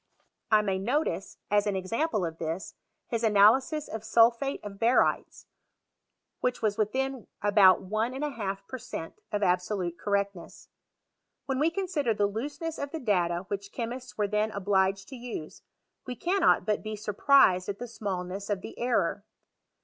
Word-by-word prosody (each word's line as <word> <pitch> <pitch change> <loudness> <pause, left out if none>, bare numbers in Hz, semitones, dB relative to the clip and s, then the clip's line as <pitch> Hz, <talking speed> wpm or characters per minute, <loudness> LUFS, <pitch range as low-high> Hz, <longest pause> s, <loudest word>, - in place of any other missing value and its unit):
I 215 -1 +5
may 195 -2 0
no 250 +10 +1
I - - -1
tice, 180 - -5
as 205 0 +3
an 205 - 0
example 210 - -1
of 165 -1 -6
this, 165 +4 -4 0.4
his 230 -1 -2
analysis 230 +8 +4
of 220 - -5
solphate 235 +4 +3
of 200 -1 -8
barytes, 235 +2 +2 1.0
whicii 250 -2 0
was 210 -2 +2
within 260 +4 -1 0.2
about 205 -2 +6
one 215 +6 -1
and 270 - -4
a 295 - -1
half 195 -5 -4
per 260 - -6
cent, 165 -8 -7
of 205 0 -1
absolute 180 -1 0
correctness. 200 -3 -3 0.8
When 265 -1 -1
we 310 +3 +3
consider 330 - -1
the 205 - +2
looseness 290 - -4
of 285 - -3
the 320 - -5
data 180 - 0
which 200 0 -4
chemists 245 +1 -6
were 210 -1 +1
then 210 +1 +1
obliged 195 -1 +1
to 270 - -8
use, 240 -10 -7 0.5
we 250 - -4
cannot 350 - +2
but 210 0 0
be 215 0 -5
surprised 210 -3 +4
at 200 - -3
the 245 - -5
smailness 195 -3 -4
of 200 -2 -1
the - - -9
error. 245 +1 0
210 Hz, 165 wpm, -28 LUFS, 195-250 Hz, 1.0 s, about